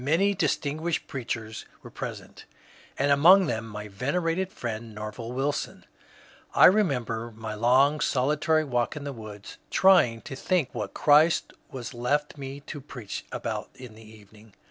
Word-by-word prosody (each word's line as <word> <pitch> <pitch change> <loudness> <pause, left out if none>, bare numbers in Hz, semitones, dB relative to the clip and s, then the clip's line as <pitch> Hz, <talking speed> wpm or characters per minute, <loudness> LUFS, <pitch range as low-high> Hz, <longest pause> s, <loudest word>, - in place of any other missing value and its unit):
Many 170 +9 +2
distin 155 -5 -1
guished 170 0 -2
preachers 115 -4 -5 0.2
were - - -11
present - - -8 0.5
and 140 +1 +2
among 180 +7 +7
them 115 -5 -3
my 105 -1 -7
venerated 165 - -1
friend 115 - -6
Nerval 110 +2 -6
Wilson. 135 +3 -3 0.7
I - - +8
remember 125 - +2
my 110 -1 -6
long 130 +7 +3
solitary 150 +4 +1
walk 125 -3 -1
in 150 - -6
the 140 -1 -5
woods 105 -3 -10
trying 165 -12 +4
to 135 - -8
think 165 -2 0
what - - -5
Christ 155 +3 +4 0.2
was 125 -2 -7
left 140 +5 -1
me 140 0 -7
to 145 0 -8
preach 125 -6 -7
about - - -4
in 125 -4 -11
the 110 - -15
evening. 110 -1 -17
130 Hz, 150 wpm, -27 LUFS, 115-150 Hz, 0.7 s, I